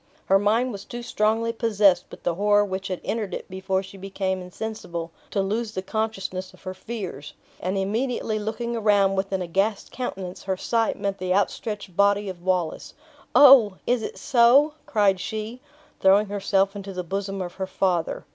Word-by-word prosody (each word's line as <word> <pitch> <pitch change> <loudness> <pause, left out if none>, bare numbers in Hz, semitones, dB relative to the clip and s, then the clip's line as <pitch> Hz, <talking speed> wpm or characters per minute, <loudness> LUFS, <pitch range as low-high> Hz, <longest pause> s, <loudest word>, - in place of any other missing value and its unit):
Her 195 +1 +4
mind 225 +5 +2
was 200 -2 -7
too 240 +2 -7
strongly 225 0 +1
possessed 205 -6 +3
with - - -12
the 175 - +1
horror 205 +3 +3
which 190 -1 -4
had 185 -2 -4
entered 210 -5 -2
it - - -7
before 190 0 -2
she 195 +1 -12
became 190 -1 -2
insensible, 180 -3 -6 0.2
to 195 - 0
lose 215 +3 -2
the 185 - -3
consciousness 195 -3 -3
of - - -23
her 185 -1 -5
fears; 185 -8 -7 0.3
and 185 +2 -2
immediately 220 +2 -1
looking 235 +3 -3
around 205 -3 +3
with 195 0 -2
an 190 -1 -1
aghast 195 +4 -1
countenance, 190 -8 -5
her 190 -1 -1
sight 230 +3 0
met 200 0 -2
the 185 0 0
outstretched 205 -1 -2
body 200 +1 +3
of 180 -2 -8
Wallace. 180 -3 -2 0.4
"Oh! 255 -8 +8
is 245 -1 +1
it - - -5
so?" 265 +5 +5
cried 200 -3 +3
she, 220 +5 -5 0.4
throwing 195 +2 +5
herself 195 0 +1
into 200 -1 -6
the 180 0 -4
bosom 195 +2 -3
of 180 -2 -4
her 190 - -1
father. 180 -3 -1
200 Hz, 175 wpm, -24 LUFS, 190-220 Hz, 0.4 s, Oh